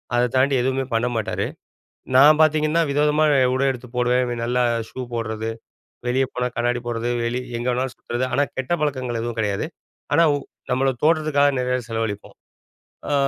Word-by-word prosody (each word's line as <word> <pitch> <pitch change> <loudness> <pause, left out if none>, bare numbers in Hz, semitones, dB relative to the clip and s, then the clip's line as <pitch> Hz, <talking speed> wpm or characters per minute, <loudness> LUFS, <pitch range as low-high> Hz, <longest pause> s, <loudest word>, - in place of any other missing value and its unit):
அத 120 0 +2
தாண்டி 135 +1 +3
எதுவுமே 130 +1 0
பண்ண 115 +2 +1
மாட்டாரு. 110 - -1 0.7
நான் 150 +3 +7
பாத்தீங்கன்னா 155 +1 +3
வித 140 +1 0
விதமா 150 +1 +3
அ - - +4 0.2
உடை 135 +1 +1
எடுத்து 125 -1 -8
போடுவேன். 125 0 +2
நல்லா 125 +1 +1 0.3
ஷூ 130 - -7
போடுறது, 110 -1 -3 0.6
வெளிய 130 +2 +2
போனா 125 0 -1
கண்ணாடி 120 0 0
போடுறது, 120 +1 -2
வெளி 120 +2 -1 0.2
எங்க 120 - -3
வேணாலும் 130 +1 -2
சுத்துறது. 120 +2 -3
ஆனா 145 - +3
கெட்ட 130 +5 -1
பழக்கங்கள் 130 -5 -1
எதுவும் 120 -1 -4
கிடையாது. 100 -2 -1 0.5
ஆனா 170 - +5
உ - - 0 0.3
நம்மளோட 135 +1 +2
தோற்றதுக்காக 155 -3 +3
நிறைய 125 0 0
செலவழிப்போம். 110 -2 -4 0.8
ஆ - - +2
125 Hz, 165 wpm, -22 LUFS, 120-140 Hz, 0.8 s, நான்